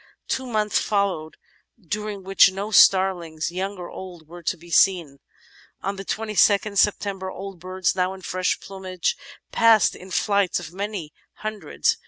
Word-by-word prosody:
Two 260 Hz, 0 st, -2 dB
months 215 Hz, -3 st, +1 dB
followed 195 Hz, -7 st, -1 dB, 0.4 s
during 210 Hz, +1 st, -5 dB
which 195 Hz, 0 st, +5 dB
no 200 Hz, +3 st, -5 dB
star 190 Hz, -2 st, +6 dB
liiigs, 165 Hz, -2 st, -5 dB
young 190 Hz, +3 st, -3 dB
or 175 Hz, -1 st, -7 dB
old, 175 Hz, -4 st, -10 dB
were 175 Hz, +2 st, -11 dB
to 175 Hz, +2 st, -2 dB
be 170 Hz, +1 st, -15 dB
seen. 165 Hz, -5 st, +3 dB, 0.6 s
On 195 Hz, +1 st, -2 dB
the 195 Hz, -, -7 dB
22nd 210 Hz, 0 st, +2 dB
September 195 Hz, -2 st, +1 dB
old 195 Hz, -1 st, -8 dB
birds, 185 Hz, +1 st, -1 dB
now 185 Hz, 0 st, 0 dB
in 190 Hz, -, -13 dB
fresh 185 Hz, +1 st, -1 dB
plumage, 190 Hz, -, -3 dB, 0.4 s
passed 230 Hz, -2 st, +5 dB
in 185 Hz, -, -12 dB
flights 200 Hz, -2 st, +1 dB
of 170 Hz, -1 st, -9 dB
many 195 Hz, -6 st, -5 dB, 0.3 s
himdreds. 215 Hz, -8 st, -1 dB
190 Hz, 155 wpm, -23 LUFS, 175-200 Hz, 0.6 s, star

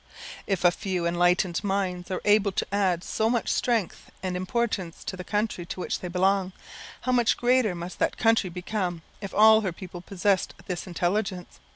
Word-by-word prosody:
If 195 Hz, -3 st, 0 dB
a 175 Hz, -, +7 dB
few 180 Hz, -1 st, -3 dB
enlightened 175 Hz, +1 st, +2 dB
minds 190 Hz, -3 st, -1 dB
are 185 Hz, -, -3 dB
able 205 Hz, -1 st, +4 dB
to -, -, -1 dB
add 185 Hz, -4 st, +1 dB
so 220 Hz, +1 st, 0 dB
much 235 Hz, -1 st, 0 dB
strength 230 Hz, -7 st, -1 dB
and 185 Hz, -1 st, -2 dB
importance 185 Hz, -2 st, -2 dB
to -, -, -4 dB
the 180 Hz, -, -7 dB
country 210 Hz, -2 st, -1 dB
to -, -, -6 dB
which -, -, -2 dB
they 180 Hz, -, -5 dB
belong, 190 Hz, +1 st, +1 dB, 0.5 s
how 255 Hz, -, -1 dB
much 240 Hz, -2 st, +3 dB
greater 245 Hz, -5 st, +2 dB
must 175 Hz, +1 st, -7 dB
that -, -, 0 dB
country 225 Hz, -4 st, +3 dB
become 180 Hz, -1 st, -3 dB, 0.2 s
if 195 Hz, -, -5 dB
all 220 Hz, +1 st, +7 dB
her 190 Hz, -4 st, -1 dB
people 175 Hz, 0 st, -9 dB
possessed 195 Hz, +1 st, 0 dB
this 180 Hz, 0 st, -4 dB
intelligence! 185 Hz, +1 st, -2 dB
190 Hz, 180 wpm, -26 LUFS, 180-210 Hz, 0.5 s, a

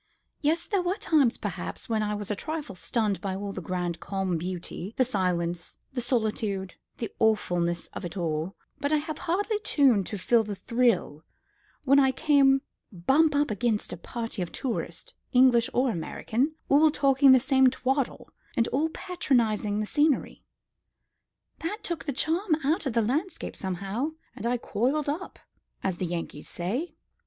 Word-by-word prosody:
"Yes; 325 Hz, +3 st, +1 dB
there 400 Hz, -3 st, +1 dB
were 360 Hz, +2 st, 0 dB
times, 290 Hz, -, +2 dB
perhaps, -, -, -5 dB
when 220 Hz, -3 st, 0 dB
I 210 Hz, 0 st, -1 dB
was 205 Hz, 0 st, -3 dB
a -, -, 0 dB
trifle 305 Hz, -1 st, -4 dB
stunned 210 Hz, +1 st, -1 dB
by 190 Hz, -1 st, -2 dB
all 200 Hz, 0 st, -4 dB
that -, -, -5 dB
grand 175 Hz, -2 st, -3 dB
calm 190 Hz, +1 st, -2 dB
beauty, 180 Hz, +3 st, -5 dB
the 255 Hz, -, +4 dB
silence, 175 Hz, -6 st, -1 dB, 0.2 s
the 250 Hz, -, -2 dB
solitude, 215 Hz, -5 st, -1 dB, 0.2 s
the 230 Hz, -, -4 dB
awfulness 175 Hz, -6 st, +1 dB
of -, -, -6 dB
it 175 Hz, +2 st, -5 dB
all; 165 Hz, +1 st, -2 dB, 0.2 s
but 285 Hz, -, -1 dB
I 305 Hz, -, +4 dB
had 305 Hz, 0 st, -4 dB
hardly 410 Hz, +5 st, 0 dB
time 275 Hz, -, +3 dB
to 205 Hz, -, -4 dB
feel 230 Hz, +4 st, +3 dB
the 210 Hz, -1 st, -5 dB
thrill 230 Hz, -10 st, +1 dB, 0.6 s
when 275 Hz, 0 st, +5 dB
I 265 Hz, -1 st, +5 dB
came 275 Hz, -1 st, +4 dB, 0.3 s
bump 275 Hz, -, +3 dB
up 290 Hz, -4 st, +2 dB
against 215 Hz, -2 st, 0 dB
a -, -, -3 dB
party 230 Hz, +3 st, -4 dB
of 175 Hz, -, -3 dB
tourists, 255 Hz, -3 st, -4 dB, 0.2 s
English 250 Hz, -2 st, +5 dB
or 250 Hz, 0 st, +2 dB
American, 235 Hz, -, -1 dB
all 300 Hz, +3 st, +6 dB
talking 275 Hz, -2 st, +5 dB
the 260 Hz, -, +8 dB
same 265 Hz, 0 st, +4 dB
twaddle, 265 Hz, +1 st, -1 dB, 0.3 s
and 230 Hz, -, +3 dB
all 305 Hz, +4 st, +1 dB
patronising 235 Hz, -, 0 dB
the -, -, -1 dB
scenery. 295 Hz, +4 st, +1 dB, 1.2 s
That 415 Hz, +7 st, -4 dB
took 340 Hz, -2 st, -3 dB
the 290 Hz, -, -1 dB
charm 325 Hz, +6 st, +1 dB
out 310 Hz, +2 st, +1 dB
of 255 Hz, -, -2 dB
the 230 Hz, -1 st, +3 dB
landscape 305 Hz, -, -2 dB
somehow, 195 Hz, -, -3 dB, 0.2 s
and 235 Hz, -, -3 dB
I 245 Hz, +1 st, +1 dB
coiled 255 Hz, +7 st, 0 dB
up, 330 Hz, +6 st, -4 dB, 0.5 s
as 190 Hz, -3 st, -1 dB
the 180 Hz, -, -2 dB
Yankees 165 Hz, -3 st, -5 dB
say. 255 Hz, -, -3 dB
240 Hz, 165 wpm, -27 LUFS, 195-290 Hz, 1.2 s, the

